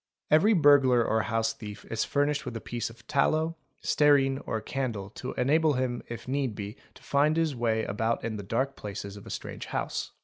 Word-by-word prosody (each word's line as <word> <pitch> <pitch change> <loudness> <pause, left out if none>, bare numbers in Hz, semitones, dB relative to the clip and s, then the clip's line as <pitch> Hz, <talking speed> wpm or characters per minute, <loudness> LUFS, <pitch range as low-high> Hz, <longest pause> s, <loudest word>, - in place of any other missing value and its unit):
Every 165 +9 +6
burglar 140 - +5
or 110 0 +2
house 115 +2 0
thief 105 -2 -9
is 115 -1 0
furnished 145 0 +1
with 120 -4 -5
a - - -5
piece 120 0 -4
of 115 - -16
tallow, 155 +4 +1 0.3
stearine, 140 -2 +4
or 110 - -1
candle 110 -5 -3
to 130 - -6
enable 150 +4 +3
him 125 -2 -1
1 - - -9
if 120 0 -7
need 130 -4 -1
be 100 0 -6 0.2
to - - -17
find 150 +3 +2
his 160 -4 +1
way 115 -2 +1
about 110 +3 -1
in 115 -1 -2
the 105 - -4
dark 125 +7 -1
places 100 -1 -6
of 100 - -11
astrange - - -6
house. - - -3
125 Hz, 200 wpm, -28 LUFS, 110-145 Hz, 0.3 s, Every